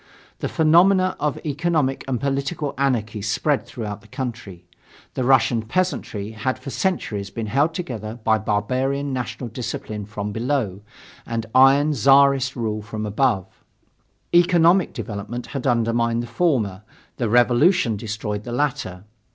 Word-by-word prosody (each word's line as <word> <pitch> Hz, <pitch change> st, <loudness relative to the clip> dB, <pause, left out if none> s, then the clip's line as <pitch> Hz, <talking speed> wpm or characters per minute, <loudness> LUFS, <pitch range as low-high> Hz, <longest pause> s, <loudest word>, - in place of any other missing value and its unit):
The -, -, -2 dB
phenomena 185 Hz, +4 st, +4 dB
of 150 Hz, -2 st, -1 dB
economic 150 Hz, -2 st, 0 dB
and 130 Hz, -3 st, -1 dB
political 140 Hz, +2 st, -2 dB
anarchy 115 Hz, -6 st, -1 dB
spread 135 Hz, +8 st, 0 dB
throughout 105 Hz, -3 st, -6 dB
the 110 Hz, -, -19 dB
country. 115 Hz, -8 st, -6 dB, 0.5 s
The 130 Hz, -, -2 dB
Russian 125 Hz, -2 st, +3 dB
peasantry 110 Hz, -, -2 dB
had 120 Hz, +4 st, -2 dB
for 130 Hz, +1 st, -8 dB
centuries 110 Hz, -, -2 dB
been 115 Hz, -2 st, -5 dB
held 140 Hz, +9 st, +1 dB
together 115 Hz, -, -5 dB
by 110 Hz, 0 st, +3 dB
barbarian 130 Hz, +7 st, -1 dB
national 125 Hz, -1 st, -4 dB
discipline 110 Hz, -3 st, -5 dB
from 105 Hz, -1 st, -5 dB
below 115 Hz, -4 st, -1 dB, 0.4 s
and 115 Hz, -1 st, -3 dB
iron 140 Hz, +3 st, +5 dB
Czarist 135 Hz, +1 st, +4 dB
rule 110 Hz, -3 st, -2 dB
from 110 Hz, 0 st, -5 dB
above. 105 Hz, -2 st, +1 dB, 0.9 s
Economic 175 Hz, +1 st, +4 dB
development 115 Hz, +1 st, -5 dB
had 135 Hz, -1 st, -2 dB
undermined 115 Hz, -1 st, +1 dB
the -, -, -5 dB
former, 115 Hz, -, 0 dB, 0.4 s
the 120 Hz, -3 st, -1 dB
revolution 120 Hz, -, +4 dB
destroyed 105 Hz, -1 st, -4 dB
the 120 Hz, -, -7 dB
latter. 120 Hz, -9 st, -2 dB
125 Hz, 135 wpm, -22 LUFS, 110-140 Hz, 0.9 s, iron